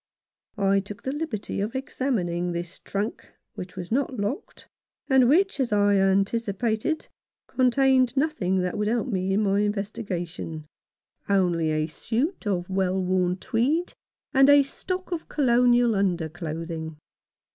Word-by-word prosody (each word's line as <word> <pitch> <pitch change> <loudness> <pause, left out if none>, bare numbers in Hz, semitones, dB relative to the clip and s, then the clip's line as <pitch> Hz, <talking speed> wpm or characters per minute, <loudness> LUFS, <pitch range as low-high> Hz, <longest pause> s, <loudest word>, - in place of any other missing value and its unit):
I 195 -1 +3
took 200 +1 -9
the 265 - -2
liberty 275 -10 -3
of 215 +5 -3
examining 180 -10 -1
this 175 +1 -5
trunk, 205 +4 -4 0.2
which 180 0 -8
was 180 0 -7
not 260 +1 0
locked, 205 - -4 0.4
and 265 -3 +5
which, 380 +3 +3
as 255 -4 0
I 205 -1 +4
anticipated, 215 - 0 0.4
contained 260 0 +3
nothing 200 - +1
that 180 0 -1
could 210 0 -1
help 235 +3 0
me 190 -3 -1
in 200 +2 +2
my 200 0 +2
investigation 190 -6 -3 0.3
— - - -69 0.3
only 175 -5 +2
a 155 0 +1
suit 230 - -2
of 180 -3 -1
well 190 0 0
worn 185 -1 +1
tweed 260 - 0 0.4
and 270 0 +6
a 285 0 +7
stock 370 +7 -5
of 335 -2 -4
Colonial 245 -3 +3
underclothing. 165 -4 -3
205 Hz, 135 wpm, -25 LUFS, 180-255 Hz, 0.4 s, a